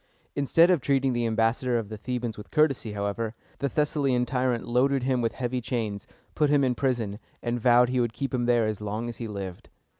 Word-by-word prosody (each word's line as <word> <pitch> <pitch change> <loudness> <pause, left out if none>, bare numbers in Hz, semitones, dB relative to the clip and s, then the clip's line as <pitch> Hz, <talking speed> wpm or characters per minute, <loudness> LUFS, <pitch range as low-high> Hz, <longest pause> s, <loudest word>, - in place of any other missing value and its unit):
Instead 165 +5 +4
of 175 -6 +2
treating 135 -1 +1
the 120 -1 0
ambassador 115 +2 +1
of 110 -3 -4
the 110 - -5
Thebans 120 0 -3
with 105 - -10
courtesy, 135 -8 +1
however, 105 +3 -3 0.2
the 140 - 0
Thessalian 140 -4 +1
tyrant 125 -3 -1
loaded 130 +2 +2
him 130 -1 +1
with 115 - 0
heavy 125 0 -2
chains, 110 -4 -3 0.3
put 150 -2 +2
him 145 -1 +4
in 130 -1 +2
prison, 120 -6 -1 0.2
and 120 0 -1
vowed 125 +1 +5
he 130 0 0
would 120 -2 +1
keep 135 +5 -4
him 120 -1 0
there 120 -2 +3
as 110 -1 -3
long 105 +3 -3
as 120 - -7
he 115 - -5
lived. 95 -4 -7
120 Hz, 210 wpm, -27 LUFS, 115-130 Hz, 0.3 s, vowed